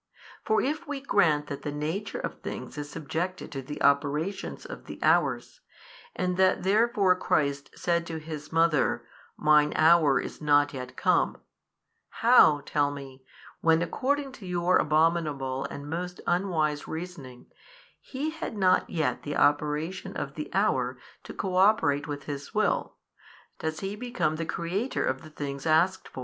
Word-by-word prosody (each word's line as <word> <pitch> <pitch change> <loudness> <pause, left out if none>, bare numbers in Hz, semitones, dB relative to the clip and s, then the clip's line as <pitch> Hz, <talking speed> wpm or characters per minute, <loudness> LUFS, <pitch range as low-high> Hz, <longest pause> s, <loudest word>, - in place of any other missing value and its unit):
For 435 0 +2
if 300 +3 -2
we 290 -1 -3
grant 165 - +2
that 140 -1 -6
the 145 - -4
nature 160 +8 -3
of - - -6
things - - -6
is 145 -1 -6
subjected 165 +4 -4
to 135 - -4
the 145 +3 -7
operations 145 - 0
of - - -9
the - - -8
hours, - - +1 0.5
and 180 0 -1
that 185 -1 +3
therefore 200 -1 +3
Christ 140 -5 0
said 170 -1 0
to 165 - -4
His 155 -2 -8
Mother, 165 -3 +2 0.3
Mine 150 -1 +4
hour 155 -3 +5
is - - -7
not 145 -1 +3
yet 125 -1 -7
come, - - +2 0.9
how 145 -1 +7
(tell 145 -1 +1
me) 135 -2 -9 0.4
when 165 0 +3
according 275 - -1
to 225 -8 -11
your 180 0 +2
abominable 150 -4 +1
and 145 0 -7
most 180 +3 -4
unwise 165 -5 0
reasoning 160 -7 -7 0.5
He 285 +4 -4
had 320 -8 -6
not 185 -2 +3
yet 160 -3 -1
the 145 - -4
operation 150 +4 0
of 140 - -4
the 150 - -6
hour 130 -11 +1 0.3
to - - -8
cooperate 185 -6 +2
with 145 -1 -5
His 140 -1 -7
Will, - - 0 0.6
does 160 0 -3
He 195 +1 -3
become 220 -9 -1
the 165 0 -3
Creator 185 +11 -2
of - - -1
the 155 - -12
things 140 -1 -5
asked 170 +4 +2
for? - - -10
160 Hz, 155 wpm, -27 LUFS, 145-185 Hz, 0.9 s, how